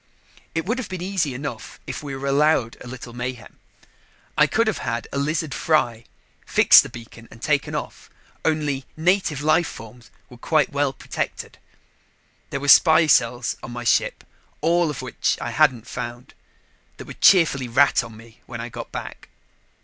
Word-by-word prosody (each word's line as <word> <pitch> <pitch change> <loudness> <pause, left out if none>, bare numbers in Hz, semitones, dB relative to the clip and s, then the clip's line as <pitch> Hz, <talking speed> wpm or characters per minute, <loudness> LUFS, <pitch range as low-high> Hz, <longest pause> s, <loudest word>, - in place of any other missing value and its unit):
It 165 - -1
would 230 +6 -1
have 255 - -6
been 185 -2 -5
easy 180 -8 -1
enough 140 +3 -7
if - - -6
we 140 -2 -6
were 135 +1 -6
allowed 140 -4 +2
a - - -10
little 125 -1 -9
mayhem. 120 -2 -7 0.8
I - - +5
could 230 - +1
have 220 -4 -1
had 115 0 -3
a 140 - -2
lizard 155 +1 -1
fry, 120 -8 0 0.4
fixed - - +7
the - - -8
beacon 115 0 -12
and - - -15
taken 145 +3 0
off. - - -6 0.3
Only 150 -4 -1
"native 165 -4 +1
life 160 +2 +3
forms" 115 +2 -11 0.2
were 125 - -14
quite 155 +1 +1
well 140 -1 0
protected. - - -6 0.9
There 140 - -3
were 145 - -5
spy 160 +2 +7
cells 120 -4 +2
on 120 - -8
my 120 0 -6
ship, 120 - +1 0.4
all 170 0 +2
of 135 -3 -5
which 125 - -1
I 120 - -4
hadn't 130 -6 +2
found, 120 -2 -7 0.6
that - - -9
would - - -12
cheerfully 160 -9 +5
rat 130 +4 +3
on 110 -1 -11
me 115 0 -17
when 120 -2 -7
I 120 +1 -5
got - - -8
back. - - -8
140 Hz, 170 wpm, -22 LUFS, 120-155 Hz, 0.9 s, fixed